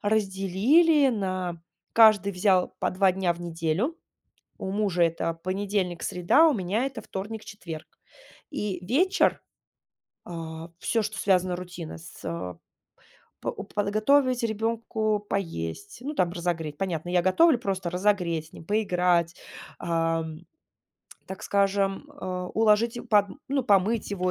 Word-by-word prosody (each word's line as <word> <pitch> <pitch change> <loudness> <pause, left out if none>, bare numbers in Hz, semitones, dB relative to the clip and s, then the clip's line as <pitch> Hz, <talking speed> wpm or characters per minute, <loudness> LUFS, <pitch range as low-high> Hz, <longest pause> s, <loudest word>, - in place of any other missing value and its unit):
разделили 220 - +3
на 185 -5 -3 0.3
каждый 215 -3 +6
взял 185 0 +3
по - - 0
2 190 0 +3
дня 185 -2 +1
в 175 - -12
неделю. 170 - -1 0.6
У 190 - -4
мужа 200 -4 +1
это 165 0 +1
понедельник, 185 0 -2
среда, 180 - +4
у 295 - +2
меня 205 +6 0
это 270 -1 -6
вторник, 210 +3 -6
четверг. 165 -6 -8 0.6
И 210 - -3
вечер, 360 - +2 0.8
а, 165 -1 -7
всё, 225 - +1
что 210 -1 -4
связано 185 -2 +2
рутина 175 - -7
с 80 - -12
а, 90 +2 -4 0.8
по - - -2
уп - - -8
подготовить 235 +5 +2
ребенку 220 -1 -1
поесть, 80 - -4
ну, 290 +3 -4
там, 175 -6 +2
разогреть, 165 -4 -3
понятно. 175 -3 -3
Я 180 -1 +3
готовлю, 275 - +5
просто 190 -5 -2
разогреть, 180 -4 0
с - - -23
ним 160 - -11
поиграть, 180 -5 +1 0.4
ам, 165 -1 -1 0.9
так 190 - -8
скажем, 200 +4 +1
а, 180 -1 -3
уложить 225 +2 +3
им 245 - -9
подм 205 +3 +3
ну, 275 -2 0
помыть 205 +1 +2
его 185 -2 0
190 Hz, 135 wpm, -26 LUFS, 175-215 Hz, 0.9 s, каждый